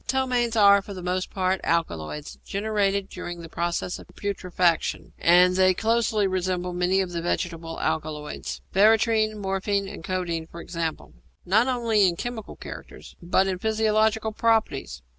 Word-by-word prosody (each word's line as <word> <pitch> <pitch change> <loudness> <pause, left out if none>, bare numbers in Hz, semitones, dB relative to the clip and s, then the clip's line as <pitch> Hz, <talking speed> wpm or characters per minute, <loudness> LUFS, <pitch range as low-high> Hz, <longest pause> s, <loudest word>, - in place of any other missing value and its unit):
Ptomaines 250 -3 +1
are, 200 -2 +6
for 200 0 -9
the 180 - -7
most 185 +1 -1
part, 185 0 0
alkaloids 150 - -2
generated 200 -1 0
during 175 -1 -7
the 165 - -8
process 170 +2 -2
of - - -13
putrefaction, 180 -4 -1
and 180 +1 +5
they 185 0 +4
closely 225 -1 +1
resemble 185 -1 -1
many 180 +2 +2
of 185 -2 -3
the 170 -1 -3
vegetable 165 -1 -3
alkaloids 150 -1 -3
veratrine, 215 +1 +4
morphine, 195 0 -1
and 165 - -9
codeine, 170 -3 -2
for 170 - -11
example 165 -2 -4 0.3
not 220 +7 +3
only 230 -6 +3
in 175 - 0
chemical 230 +2 -6
characters, - - -10
but 180 +2 +2
in 185 -1 -2
physiological 220 +1 +1
properties. 215 - 0
190 Hz, 145 wpm, -25 LUFS, 175-215 Hz, 0.3 s, are